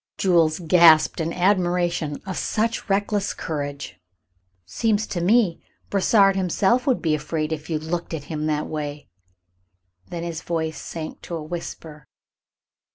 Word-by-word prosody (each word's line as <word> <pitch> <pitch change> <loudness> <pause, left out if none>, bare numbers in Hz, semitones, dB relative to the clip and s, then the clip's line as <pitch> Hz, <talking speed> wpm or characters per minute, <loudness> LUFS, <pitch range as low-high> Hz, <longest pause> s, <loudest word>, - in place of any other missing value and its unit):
Jules 165 -4 +3
gasped 165 -2 +5
in 160 +1 -1
admiration 175 -4 0
of 190 -2 -4
such 225 0 -1
reckless 205 0 0
courage. 145 - -5 0.7
"Seems 215 - 0
to 175 - -4
me 195 -2 +3 0.3
Brossard 195 0 +4
himself 195 - +1
would 260 - +1
be 160 -2 +2
afraid 155 +1 -2
of 155 +1 -7
you 160 - -1
if 155 - -8
you - - -8
looked 170 0 -3
at 150 - -6
him 155 +1 -4
that 150 -1 0
way." 150 -1 -5 1.0
Then 170 -1 -5
his 165 -1 -4
voice 160 -3 -3
sank 160 -2 -7
to 170 - -6
a 160 - -5
whisper. 155 -3 -8
170 Hz, 150 wpm, -23 LUFS, 155-190 Hz, 1.0 s, gasped